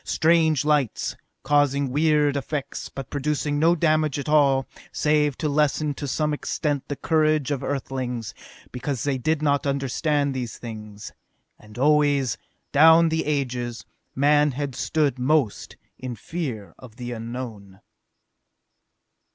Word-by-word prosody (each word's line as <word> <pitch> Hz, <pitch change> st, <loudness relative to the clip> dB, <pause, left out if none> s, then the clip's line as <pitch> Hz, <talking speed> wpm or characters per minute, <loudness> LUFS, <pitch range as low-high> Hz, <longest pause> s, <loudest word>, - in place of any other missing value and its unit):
Strange 160 Hz, -3 st, +2 dB
lights, 150 Hz, -6 st, 0 dB, 0.3 s
causing 140 Hz, -1 st, +2 dB
weird 150 Hz, 0 st, +2 dB
effects, 140 Hz, 0 st, -4 dB
but 135 Hz, -3 st, -8 dB
producing 145 Hz, +1 st, -1 dB
no 165 Hz, +3 st, +4 dB
damage 155 Hz, -3 st, +1 dB
at 140 Hz, -, -5 dB
all, 140 Hz, -3 st, +3 dB, 0.3 s
save 150 Hz, -2 st, +1 dB
to 155 Hz, -, -1 dB
lessen 150 Hz, 0 st, +1 dB
to 145 Hz, +1 st, -6 dB
some 150 Hz, +3 st, 0 dB
extent 145 Hz, -1 st, -2 dB
the 145 Hz, -, -3 dB
courage 155 Hz, -2 st, +1 dB
of 140 Hz, -, -1 dB
Earthlings, 130 Hz, -4 st, -3 dB, 0.4 s
because 125 Hz, -1 st, -3 dB
they 140 Hz, -2 st, -1 dB
did 155 Hz, +3 st, 0 dB
not 145 Hz, -1 st, +1 dB
understand 140 Hz, +1 st, 0 dB
these 125 Hz, -3 st, -5 dB
things. 105 Hz, -3 st, -9 dB, 0.5 s
And 105 Hz, +2 st, -15 dB
always, 145 Hz, -2 st, +3 dB, 0.4 s
down 160 Hz, +3 st, +6 dB
the 160 Hz, 0 st, -1 dB
ages, 125 Hz, -5 st, -2 dB, 0.3 s
man 145 Hz, +1 st, +3 dB
had 140 Hz, 0 st, -3 dB
stood 145 Hz, +1 st, 0 dB
most 135 Hz, -4 st, 0 dB, 0.2 s
in 130 Hz, -2 st, -5 dB
fear 115 Hz, -, -5 dB
of 120 Hz, -4 st, -13 dB
the 120 Hz, 0 st, -6 dB
Unknown. 115 Hz, -4 st, -7 dB
140 Hz, 130 wpm, -24 LUFS, 125-150 Hz, 0.5 s, down